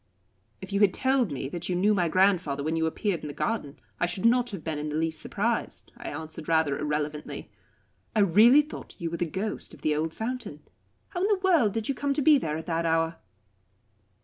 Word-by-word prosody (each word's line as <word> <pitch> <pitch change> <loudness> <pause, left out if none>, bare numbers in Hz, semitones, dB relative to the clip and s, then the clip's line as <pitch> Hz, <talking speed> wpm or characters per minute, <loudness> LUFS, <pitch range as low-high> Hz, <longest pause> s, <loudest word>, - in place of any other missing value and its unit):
"If 190 +1 -8
you 200 - +2
had 205 -3 +4
told 260 - +1
me 135 -1 -3
you 180 +1 -2
knew 200 +4 +3
my 180 -4 +1
grandfather 180 -7 +2
when 160 +2 -1
you 160 0 +1
appeared 180 +2 -1
in - - -6
the 145 - -6
garden, 150 -8 -2 0.2
I 175 - +2
should 185 +4 -4
not 245 +1 +4
have 195 -8 -7
been 155 -2 -3
in 150 +1 -3
the 150 - -3
least 160 0 -1
surprised," 230 +3 -2
I 240 - -7
answered 160 +1 -7
rather 160 -4 +2
irrelevantly. 150 0 -3 0.6
"I 215 - +4
really 220 - +6
thought 300 - -10
you 165 -1 -4
were 170 - -3
the 175 - -1
ghost 195 +6 -4
of - - -20
the 155 -1 +2
old 155 +2 -1
fountain. 220 - -5 0.5
How 355 - -4
in 390 - +3
the 415 -2 +3
world 320 - +4
did 225 -1 -2
you 275 - +1
come 280 +2 -1
there 275 - +3
at 160 - -7
that 165 -1 -1
hour?" 165 0 +1
180 Hz, 210 wpm, -27 LUFS, 160-230 Hz, 0.6 s, really